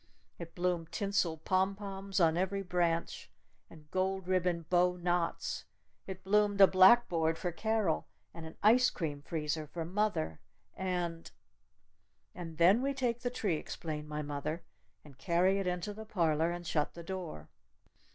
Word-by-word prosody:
It 165 -1 -9
bloomed 175 -2 -1
tinsel 195 -6 0
pompons 195 +2 -1
on 165 -2 +4
every 190 +2 -1
branch! 175 -2 -1 0.4
And 150 -2 -16
gold 190 0 -1
ribbon 180 -3 0
bow 180 0 +3
knots! 175 -1 -1 0.4
It 190 -1 -7
bloomed 205 0 +2
a 195 - +11
blackboard 185 -4 +5
for 175 - -2
Carol! 220 -2 0 0.3
And 165 -1 -8
an 160 - -12
ice 245 +4 +6
cream 145 -4 -4
freezer 155 0 -3
for 165 +2 -5
mother! 180 - -1 0.4
And 175 -3 -3 0.5
" - - -45
"And 165 -3 -8
then 185 +8 +5
we 275 +1 -1
take 245 -3 -1
the 245 - -2
tree," 205 -9 -1
explained 150 -1 -6
my 150 0 -3
mother, 145 +3 -4 0.4
"and 140 -3 -16
carry 180 +6 +2
it 195 - -2
into 180 +3 -2
the 220 +1 -9
parlor. 165 -6 +1
And 175 0 -5
shut 150 -3 -1
the 170 - -8
door." 170 - -6
175 Hz, 150 wpm, -32 LUFS, 165-195 Hz, 0.5 s, a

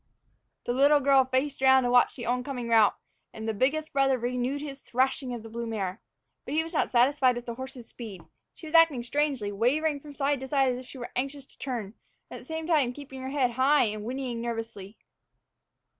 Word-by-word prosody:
The 240 - -1
little 285 +3 +5
girl 275 -1 +4
faced 260 +2 -1
around 265 0 +6
to 245 - 0
watch 245 0 +4
the 240 - -6
oncoming 250 0 -2
rout, 225 -2 +5 0.4
and 220 0 -6
the 220 - 0
biggest 285 +8 0
brother 270 -1 +3
renewed 250 +3 -2
his 280 -2 -7
thrashing 260 0 -1
of 235 -2 -5
the 225 - -9
blue 235 +1 -5
mare. 200 -3 -3 0.4
But 290 - -4
he 320 - +2
was 330 +2 -8
not - - +1
satisfied 255 +1 +3
with 240 0 -6
the 235 - -4
horse's 260 -1 -8
speed. 205 -8 -9 0.3
She - - -12
was 310 - -9
acting 325 -7 +5
strangely, 270 -5 -1
wavering 285 +8 +1
from 290 0 -12
side 280 -1 0
to 265 - -6
side 270 -2 +2
as 245 - -5
if 255 - -10
she 270 - -11
were 240 - -7
anxious 275 +2 -3
to - - -19
turn, 235 -7 -4 0.4
at - - -7
the - - -15
same 320 -1 -5
time 295 -7 +2
keeping 270 -1 -9
her 260 - -5
head 265 -3 +1
high 265 +4 +4
and 215 -2 -3
whinnying 250 0 -4
nervously. 225 -4 -5
260 Hz, 215 wpm, -28 LUFS, 235-280 Hz, 0.4 s, around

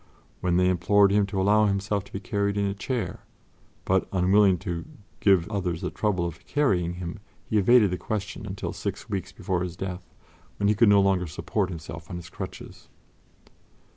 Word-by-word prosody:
Then 90 -1 +1
they 90 0 +4
implored 95 +3 +4
him 100 0 +3
to 100 -1 -3
allow 105 +2 +4
himself 100 0 -1
to - - -17
be 95 - -4
carried 100 +1 -1
in 100 - +1
a 100 - 0
chair, 110 -1 -3 0.7
but, 95 0 +1
unwilling 95 +1 +4
to 85 -1 -3 0.4
give 95 -4 +4
others 90 -5 -2
the - - -3
trouble 95 -5 0
of 85 -1 -6
carrying 95 - +1
him, 90 -1 -6 0.3
he 110 - +1
evaded 105 0 +5
the 90 - -2
question 105 +2 -4
until 95 0 -4
six 105 +5 -5
weeks 95 -3 -3
before 90 -2 -2
his 90 -1 -4
death, 95 0 -5 0.6
when 100 - +1
he 105 - +4
could 110 +1 +4
no 100 -1 +6
longer 95 -2 +2
support 90 +5 -2
himself 80 -1 -8
on 90 - -5
his 85 -1 -8
crutches. - - -9
95 Hz, 185 wpm, -26 LUFS, 90-105 Hz, 0.7 s, no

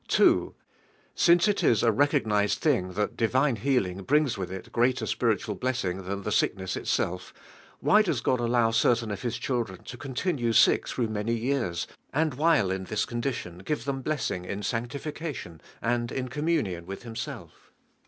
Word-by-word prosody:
(2) - - +3 0.6
Since 170 +2 +4
it 205 - +1
is 115 - +4
a 115 - +5
recog 145 +4 +2
nisi 105 -1 +2
d 155 - +2
tiling 95 -9 -1
that 105 +1 -1
divine 130 +3 +2
healing 100 -6 0
brings 145 +4 +2
with 95 -3 -5
it 95 -1 -8
greater 125 +2 +2
spiritual 110 -3 0
blessing 95 -4 -2
than 100 +1 -3
the - - -3
sickness 95 -1 0
itself, 90 +1 -2 0.5
why 210 - +5
does 200 - 0
God 130 - +1
allow 120 -1 +2
cer 115 +1 +4
tain 115 -2 -4
'of 100 - -4
His 120 -2 -2
children 115 -7 -3
to 125 - -8
continue 130 -2 -1
sick 115 - +5
through 120 -3 -1
many 110 +2 -1
years, 115 -8 -1 0.3
and 155 0 +1
while 145 - +3
in 95 0 -3
this 105 +2 -1
condition 120 -8 -4
give 145 +11 -3
them 135 -1 -2
blessing 135 -10 -2
in 100 +2 -5
sanctifi 125 +7 -3
cation, 125 - -6 0.2
and 120 0 0
in 130 -1 -3
communion 120 - -1
with 100 +4 -7
Himself? 115 -1 -8
120 Hz, 175 wpm, -27 LUFS, 100-135 Hz, 0.6 s, a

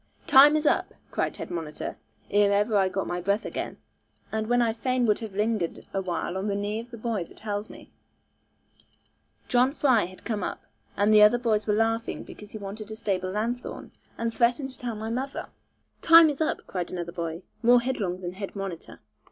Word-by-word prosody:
'Time 290 +2 +8
is 310 0 0
up,' - - +1 0.2
cried - - -1
head - - -6
monitor, 160 -3 -5 0.4
ere 205 0 +4
ever 210 +2 +2
I 190 -2 +4
got 190 +1 -2
my 175 0 -3
breath 200 +4 0
again; - - -4 0.5
and 220 0 -2
when 245 +1 +3
I 230 -2 +2
fain 255 +2 0
would 210 -2 +2
have 220 -4 -7
lingered 210 -4 -1
awhile 185 -1 -2
on 195 - -3
the 200 - 0
knee 205 +2 -2
of 235 +1 -9
the 235 - -9
boy 220 -4 -2
that - - -18
held 210 0 -3
me. - - -13 1.6
John 250 +2 +3
Fry 260 - +3
had 185 +1 -13
come 215 -3 -2
up, - - -4 0.3
and 205 +2 +4
the 210 +2 +7
boys 220 -3 0
were 210 - +2
laughing 225 +1 0
because 210 - -12
he - - -7
wanted 205 +1 -7
a 220 - -6
stable 190 -4 -2
lanthorn, 230 +5 -4 0.3
and 230 0 -2
threatened 245 +4 +1
to 255 - -12
tell 240 -2 -4
my 220 +1 -4
mother. 265 +4 -4 0.5
'Time 330 -1 +8
is 285 - -6
up,' 315 - -1
cried 180 -2 -4
another 175 -2 -4
boy, 170 0 -4 0.2
more 245 +1 +6
headlong 200 -8 -2
than 175 -1 -4
head 195 +2 -7
monitor. 195 -4 -6
215 Hz, 195 wpm, -27 LUFS, 195-240 Hz, 1.6 s, Time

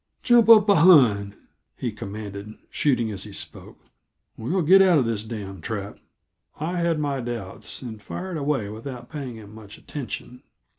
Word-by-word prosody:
"Jump 240 -3 +5
up 215 -3 +9
behind," 135 - +5 0.4
he 120 - -3
commanded, 100 0 -7 0.2
shooting 120 -6 +1
as 100 -2 -5
he 105 - -9
spoke. 100 - -7 0.6
"We'll 170 +11 -1
get 190 +5 +7
out 185 -4 +5
of 130 - +2
this 110 -2 -2
damned 100 -5 -7
trap." 100 +2 -5 0.6
I 175 +4 -2
had 170 -1 +1
my 145 -3 -1
doubts, 115 -1 -6
and 110 -4 -8
fired 180 - -6
away 140 -7 -1
without 120 +3 -8
paying 140 -6 -6
him 105 -2 -12
much 105 -2 -12
attention. 125 -2 -7
120 Hz, 155 wpm, -24 LUFS, 105-155 Hz, 0.6 s, up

